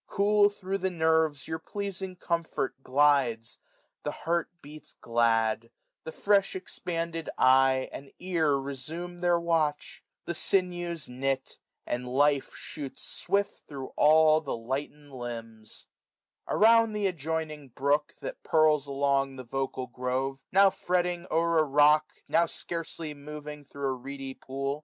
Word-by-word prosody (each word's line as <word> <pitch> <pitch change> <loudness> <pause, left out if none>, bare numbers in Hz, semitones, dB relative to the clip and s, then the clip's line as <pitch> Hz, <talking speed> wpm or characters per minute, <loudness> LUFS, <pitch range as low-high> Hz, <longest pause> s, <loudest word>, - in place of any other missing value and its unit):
475 - - -34
Cool, 205 0 +5
thro' 195 -1 -4
the 190 0 -1
nerves, 160 -4 +1
your 160 0 -3
pleasing 190 +1 -5
comfort 170 -6 -2
glides; 130 -5 +2 0.4
The - - -3
heart 170 +1 -1
beats 150 +1 -10
glad; 115 -1 +1 0.4
the 160 - -5
fresh»expanded 175 -4 -1
eye 130 0 +4
And 140 0 -9
ear 165 -6 +1
resume 155 +6 -5
their 175 -1 +3
watch; 160 -3 -1 0.2
the 170 - -2
sinews 175 -2 0
knit; 135 +1 -3 0.3
And 125 +1 -3
life 140 +1 +2
shoots 145 -4 -7
swift 200 0 -2
thro' 135 -3 -7
all 155 +1 +5
the 140 -6 -4
lightened 140 +5 -5
limbs* 115 -3 -7 0.6
Around 225 0 +5
th' 210 -1 0
adjoining 160 -4 -3
brook, 140 +4 0
that - - -6
purls 155 -2 +3
along 140 -1 +1
480 - - -12
The 130 - -7
vocal 135 -1 -2
grove, 130 +2 -2
now 195 +1 +6
fretting 180 -1 -1
o'er 165 0 +2
a - - +5
rock. 150 +1 +4 0.2
Now 170 - +3
scarcely 165 -2 -5
moving 150 0 -8
thro' 140 0 -4
a - - 0
reedy 135 +1 -7
pool. 135 +2 -4
150 Hz, 135 wpm, -28 LUFS, 135-170 Hz, 0.6 s, now